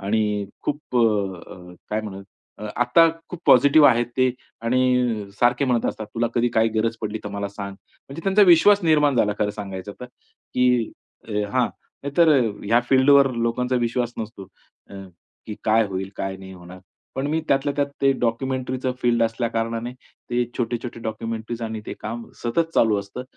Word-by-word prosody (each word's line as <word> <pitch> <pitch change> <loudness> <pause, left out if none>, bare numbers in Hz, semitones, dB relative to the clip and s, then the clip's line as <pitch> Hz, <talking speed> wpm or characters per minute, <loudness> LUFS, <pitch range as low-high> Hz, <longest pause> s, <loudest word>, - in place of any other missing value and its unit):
आणि 105 0 0 0.2
खूप 145 -3 -3
अ, 100 -6 +1
अ, 90 -1 -12 0.2
काय 105 +1 0
म्हणूयात 100 -2 -8 0.5
आता 125 +8 +5 0.2
खूप 180 - -7
पॉझिटिव्ह 145 +4 +7
आहेत 120 -2 +2
ते 130 -1 +3 0.3
आणि 125 -4 +1
सारखे 120 +3 +3
म्हणत 125 -3 +1
असतात, 110 - -4
"तुला 120 0 +1
कधी 120 0 +2
काही 115 0 +4
गरज 115 +1 -1
पडली, 110 0 -3
तर - - -4
मला 100 0 -4
सांग." 100 -1 -7
म्हणजे 140 +9 -13
त्यांचा 195 +2 +4
विश्वास 200 +2 +6
निर्माण 150 -4 +3
झाला 105 -3 +2
खरं 105 -1 +1
सांगायचं 100 -1 -7
तर, 125 - -6 0.5
की 125 -2 +2 0.6
हां, 130 -2 +2 0.4
नाहीतर 140 +4 +3 0.4
ह्या 115 +4 +3
फील्डवर 135 0 +5
लोकांचा 125 +2 0
विश्वास 120 0 -1
नसतो, 110 -3 -7 0.4
अ, 100 - -11 0.5
की 105 - -5
काय 110 +1 +4
होईल? 95 0 -5
काय 95 0 -3
नाही 95 0 -11
होणार? 90 0 -12 0.4
पण 135 +1 -2
मी 155 +2 0
त्यातल्या 140 +1 +1
त्यात 145 -1 +1 0.2
ते 135 0 +5
डॉक्युमेंटरीचं 130 +2 -1
फील्ड 120 -1 +2
असल्या 115 +1 -1
कारणाने 115 +1 -3 0.4
ते 120 0 +1
छोटे-छोटे 120 0 -3
डॉक्युमेंटरीज 115 +1 -5
आणि 110 -1 -4
ते - - -5
काम 115 +2 -5 0.2
सतत 165 +8 0
चालू 110 -3 +3
असतं 100 +6 -8
120 Hz, 165 wpm, -23 LUFS, 105-130 Hz, 0.6 s, पॉझिटिव्ह